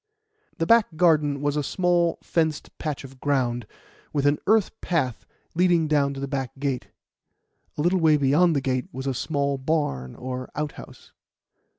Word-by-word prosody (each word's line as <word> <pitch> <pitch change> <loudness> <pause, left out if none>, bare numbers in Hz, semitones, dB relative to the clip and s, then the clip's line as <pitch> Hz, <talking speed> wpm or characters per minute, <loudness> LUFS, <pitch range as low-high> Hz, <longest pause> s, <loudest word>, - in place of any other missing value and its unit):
The 165 - 0
back 225 -4 +4
garden 150 -5 +3
was 145 0 0
a 150 - +1
small, 175 +2 +1
fenced 160 -3 -1
patch 150 -3 -3
of 135 -1 -12
ground, 125 -5 0 0.4
with 145 -2 0
an 145 +1 +3
earth 215 -1 +4
path 130 -9 -1 0.3
leading 175 -2 +3
down 140 -2 +2
to - - -6
the 140 - -3
back 135 -2 -4
gate. 135 -3 -2 0.9
A - - 0
little 180 +2 +3
way 155 -2 +5
beyond 150 +5 +3
the 140 - +1
gate 130 -2 -1
was 130 +1 -6
a 135 - 0
small 140 +1 -1
barn 130 - -1
or 130 0 -5
outhouse. 150 0 -7
145 Hz, 165 wpm, -25 LUFS, 135-165 Hz, 0.9 s, way